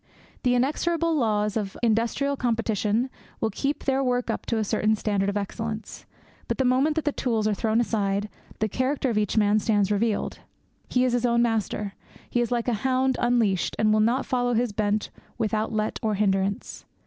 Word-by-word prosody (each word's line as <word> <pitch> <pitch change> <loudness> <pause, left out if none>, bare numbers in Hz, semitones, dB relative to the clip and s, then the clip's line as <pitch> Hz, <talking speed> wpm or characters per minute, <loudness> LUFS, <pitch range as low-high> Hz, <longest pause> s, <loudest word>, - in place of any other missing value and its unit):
The 250 -1 +2
inexorable 330 +6 +1
laws 210 -6 +1
of 205 -3 -3
industrial 235 +5 +1
competition 230 -2 0 0.3
will 220 - 0
keep 275 +8 -2
their 270 0 +1
work 250 -1 0
up - - -5
to 230 - 0
a 220 - +1
certain 215 +1 +1
standard 200 -2 0
of 200 - -1
excellence. 220 +2 -5 0.4
But - - -1
the 265 - +1
moment 265 +5 +3
that 320 - -1
the 295 - +2
tools 225 -6 0
are 215 - +2
thrown 220 +2 +1
aside 205 -3 0 0.3
the 220 - 0
character 260 +3 0
of 215 - -1
each 210 +1 -1
man 210 0 +4
stands 205 -2 +1
revealed. 210 +1 0 0.5
He 250 0 +2
is 250 - +1
his 245 0 +2
own 235 0 +3
master. 215 -3 -1 0.4
He 240 - +2
is 240 - -1
like 240 0 0
a 245 - +2
hound 260 0 +2
unleashed, 235 -6 +1
and 215 0 +3
will 215 - +3
now 240 +5 +2
follow 245 -1 0
his 240 0 +1
bent 210 0 0 0.3
without 220 -1 -1
let 215 -1 -1
or 215 -2 0
hindrance. 195 -1 -1
225 Hz, 190 wpm, -25 LUFS, 210-250 Hz, 0.5 s, man